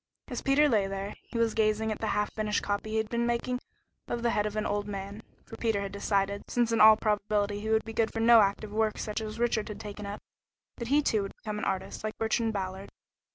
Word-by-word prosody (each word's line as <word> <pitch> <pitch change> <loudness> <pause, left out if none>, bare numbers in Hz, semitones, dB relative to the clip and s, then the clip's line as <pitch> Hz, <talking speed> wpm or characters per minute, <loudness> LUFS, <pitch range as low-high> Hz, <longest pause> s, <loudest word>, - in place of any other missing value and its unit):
As - - -4
Peter 290 +2 +4
lay 210 -7 +2
there, 195 +1 -4
he 235 - -7
was 230 -1 +2
gazing 220 0 +1
at 215 - -4
the 220 - -2
half 210 0 0
finished 215 -1 -1
copy 205 +1 -2
he 220 - -1
had 220 0 0
been 235 +1 0
making 245 +1 -1 0.5
of 235 0 -3
the 235 - +2
head 210 0 +1
of 210 - -6
an 215 - -1
old 205 0 -1
man, 200 +1 -6 0.2
for 225 - -10
Peter 225 -3 0
had 200 -1 -4
decided, 200 0 -1
since 240 -1 +1
in 230 - +3
all 215 0 +9
probability 205 -1 0
he 215 +1 -4
would 220 0 +2
be 225 - -6
good 225 0 +1
for 225 - -4
no 230 0 +7
active 205 +1 0
work 215 0 0
such 210 +1 -3
as 215 0 -5
Richard 230 -2 0
had 210 -2 -7
taken 210 -1 -7
up, 205 +1 -5 0.6
that 235 - -5
he 290 +4 +3
too 220 -6 +2
would 195 - -6
become 210 -1 -5
an - - -3
artist, 190 +1 -3
like 215 0 -4
Bertrand 225 0 +1
Ballard. 190 -1 -4
215 Hz, 245 wpm, -29 LUFS, 205-225 Hz, 0.6 s, all